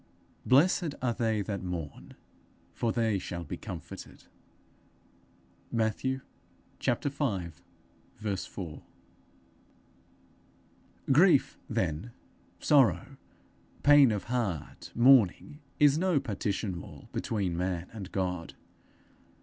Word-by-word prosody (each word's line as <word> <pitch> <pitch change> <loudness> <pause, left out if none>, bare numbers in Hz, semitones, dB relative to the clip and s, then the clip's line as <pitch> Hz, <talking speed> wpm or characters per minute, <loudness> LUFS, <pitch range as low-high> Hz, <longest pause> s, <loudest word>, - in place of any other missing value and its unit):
_ - - -32 0.4
'Blessed 160 +4 +4
are 125 -2 0
they 110 -3 0
that 100 -1 -4
mourn, 85 -5 -6 0.6
for 115 - 0
they 110 -4 +1
shall 85 -1 -5
be 75 - -5
comforted.' - - -9 1.5
Matthew 120 +4 0 0.6
v. 105 - -3
4. 85 -7 -7 2.3
Grief, 160 +1 +5
then, 80 +10 -2 0.5
sorrow, 135 - +3 0.7
pain 145 -4 +7
of 105 -3 -2
heart, 115 - -3
mourning, 130 - +4 0.2
is 145 +1 +5
no 180 -4 +2
partition 100 -6 -3
wall - - -12
between 100 -6 -1
man 90 0 -2
and 100 -4 -7
God. 90 -3 -3
110 Hz, 90 wpm, -30 LUFS, 90-135 Hz, 2.3 s, pain